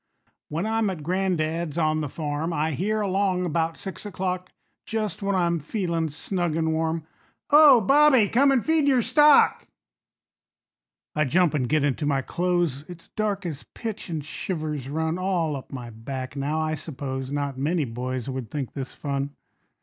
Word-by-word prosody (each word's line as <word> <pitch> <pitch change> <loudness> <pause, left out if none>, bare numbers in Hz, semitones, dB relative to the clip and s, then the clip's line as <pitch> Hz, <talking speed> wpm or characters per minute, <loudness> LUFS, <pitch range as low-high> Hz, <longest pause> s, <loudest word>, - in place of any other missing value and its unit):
When 165 +6 -2
I'm 220 -1 +1
at 170 -6 -5
gran'dad's 170 -3 -1
on 155 -1 +1
the 150 - -3
farm, 150 +2 -3
I 160 0 0
hear 210 +9 -1
along 190 -2 +1
'bout 165 0 0
six 190 - -6
o'clock, 185 -3 -3 0.3
Just 215 -5 -3
when 200 0 0
I'm 170 -2 +1
feelin' 165 -1 -2
snug 175 +2 -1
an' 160 -1 +1
warm, 160 0 -1 0.5
"Ho, 295 -4 +9
Bobby, 270 -1 +5
come 275 +7 +4
and 260 -4 +2
feed 320 -2 +3
your 260 -4 +4
stock." 295 +2 +5 1.5
I 150 0 +1
jump 170 +4 +3
an' 140 -4 +1
get 150 +4 +1
into 145 +1 0
my 135 -2 +1
clothes; 175 -5 0
It's 175 -2 -11
dark 205 -3 -2
as 155 -4 -4
pitch, 220 -3 -5
an' 160 -3 -2
shivers 150 -3 -4
run 160 +3 -1
All 175 -5 0
up 135 - -8
my 120 -3 -7
back. 130 +4 -6
Now, 145 +3 -1
I 155 0 0
suppose 135 -3 -5
Not 140 -2 -2
many 155 +2 +1
boys 125 +1 -4
would 130 -4 -4
think 140 -2 -4
this 135 -2 -6
fun. 140 0 -3
160 Hz, 165 wpm, -25 LUFS, 145-190 Hz, 1.5 s, Ho